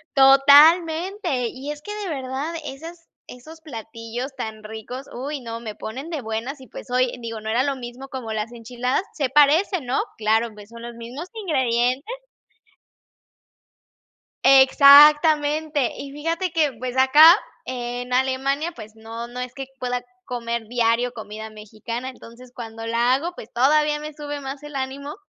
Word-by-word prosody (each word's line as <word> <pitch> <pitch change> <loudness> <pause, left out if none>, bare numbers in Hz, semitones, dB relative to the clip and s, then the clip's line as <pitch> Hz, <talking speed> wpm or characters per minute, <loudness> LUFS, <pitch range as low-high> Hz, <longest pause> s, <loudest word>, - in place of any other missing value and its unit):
Totalmente. 310 - +5
Y 270 +4 -7
es 295 0 -11
que 415 - -7
de 415 -3 -5
verdad 275 +2 -4
esas 330 +5 -9 0.2
esos 315 +6 -13
platillos 230 0 -7
tan 220 -3 -6
ricos, 220 +5 -8
uy 275 +3 -5
no, 230 -1 -6
me 220 -3 -7
ponen 265 +11 -7
de 310 -4 -3
buenas, 230 +5 -5
y, 260 - -12
pues, - - -11
oye, 250 0 +1
digo, 225 -1 -6
no 215 - -7
era 235 +3 +2
lo 280 0 -1
mismo 250 +1 -9
como 235 -5 -6
las 215 +2 -3
enchiladas, 245 +2 -2
se 275 -5 -1
parecen, 300 - +3
¿no?, 250 - 0 0.2
Claro, 220 +2 +1
pues, 210 0 -14
son 235 0 -12
los 240 0 -7
mismos 245 +9 -8
ingredientes. 265 - 0 2.3
Exactamente. 295 +1 +6
Y 275 0 -8
fíjate 330 +5 -2
que, 310 -4 +1
pues, 255 +1 -5
acá 295 +6 +8 0.3
en 245 0 -5
Alemania, 270 +5 0
pues, 215 -2 -11
no 225 +1 -8
no 250 +1 -7
es 250 0 -6
que 270 -1 -6
pueda 250 -1 -2 0.2
comer 235 -2 -4
diario 240 0 +1
comida 220 -1 -8
mexicana, 220 +4 -7
Entonces 250 0 -13
cuando 225 -1 -8
la 235 +2 +2
hago, 335 +6 -3
pues, 220 - -11
todavía 295 +4 +2
me 300 0 -7
sube 290 -1 -6
más 275 +1 -7
el 295 -1 -9
ánimo. 275 +2 -5
260 Hz, 155 wpm, -22 LUFS, 235-295 Hz, 2.3 s, acá